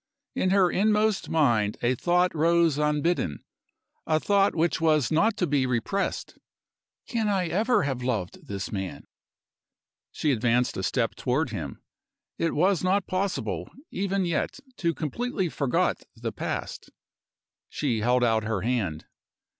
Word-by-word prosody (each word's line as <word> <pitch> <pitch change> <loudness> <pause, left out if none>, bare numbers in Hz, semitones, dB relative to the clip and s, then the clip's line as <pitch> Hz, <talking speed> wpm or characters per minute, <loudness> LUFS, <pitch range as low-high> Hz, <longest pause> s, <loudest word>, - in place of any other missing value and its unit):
In 185 - 0
her 190 -2 +4
inmost 210 0 +2
mind 115 -10 +2
a 120 +1 +3
thought 180 +7 +2
rose 165 -1 +3
unbidden 150 - 0 0.6
a 155 0 +3
thought 200 +3 +2
which 165 0 +1
was 155 -6 +3
not 210 +7 +2
to 180 - +1
be 140 -4 +1
repressed. 125 - -2 0.7
"Can 225 -3 -1
I 190 -3 +1
ever 220 +7 +2
have 135 -3 -2
loved 115 -8 -3
this 100 -1 -4
man?" 95 -2 -5 1.1
She 150 - 0
advanced 120 0 +1
a - - -3
step 115 +5 0
toward 130 +3 -1
him; 80 -10 -6 0.6
it 165 - 0
was 185 +3 +2
not 185 +1 +2
possible, 190 +1 -2 0.2
even 195 0 -1
yet, 170 - -1 0.2
to 170 -2 0
completely 190 - -2
forgot 140 -4 0
the - - -4
past. - - -5 0.8
She 125 -7 -1
held 125 +3 +2
out 110 -2 +2
her 110 -3 -2
hand. 105 -10 -1
155 Hz, 140 wpm, -26 LUFS, 120-185 Hz, 1.1 s, her